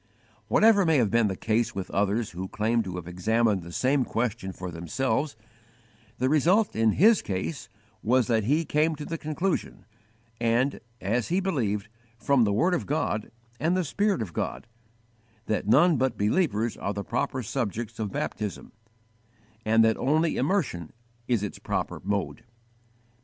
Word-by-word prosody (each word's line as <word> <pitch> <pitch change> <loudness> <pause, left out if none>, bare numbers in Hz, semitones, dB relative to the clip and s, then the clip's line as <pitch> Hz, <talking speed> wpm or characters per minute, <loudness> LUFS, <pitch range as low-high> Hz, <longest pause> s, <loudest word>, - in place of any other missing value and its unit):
"_ - - -40 0.4
Whatever 215 - +5
may 160 -3 +3
have 115 -6 +2
been 115 -1 +3
the 95 - -2
case 115 +3 0
with 95 -2 -5
others 105 +3 0
who 95 +2 -5
claim 110 +4 0
to 95 -4 -5
have 90 -2 -6
examined 105 +3 +1
the 85 0 -10
same 130 +8 +2
question 115 -5 -2
for 90 0 -7
themselves, 130 - -1 0.8
the 130 - +1
result 170 +9 +3
in 110 -1 +3
his 215 +6 +5
case 105 - -4 0.3
was 125 +2 +3
that 110 -3 +1
he 150 +7 +2
came 155 +2 +1
to 150 0 -7
the 165 -1 -4
conclusion, 155 +5 -2 0.5
and, 120 +4 +1 0.2
as 115 +5 0
he 180 +3 +1
believed, 115 - -1 0.3
from 120 +1 +3
the 100 - +1
word 170 - +2
of 175 - -1
God 140 -7 -1 0.3
and 170 +4 +1
the 185 - +1
Spirit 200 - 0
of 90 -6 -9
God, - - -3 0.8
that 105 -2 -1
none 150 +8 +5
but 130 -1 0
believers 110 - +1
are 100 0 -4
the 100 - -3
proper 125 +3 -2
subjects 115 -1 -3
of 105 -3 -2
baptism, 105 0 -4 0.9
and 115 +1 +4
that 110 0 +2
only 155 +4 +1
immersion 130 - -1 0.4
is 120 -5 +1
its 105 - -5
proper - - -3
mode. 100 +2 -2
115 Hz, 165 wpm, -27 LUFS, 105-150 Hz, 0.9 s, Whatever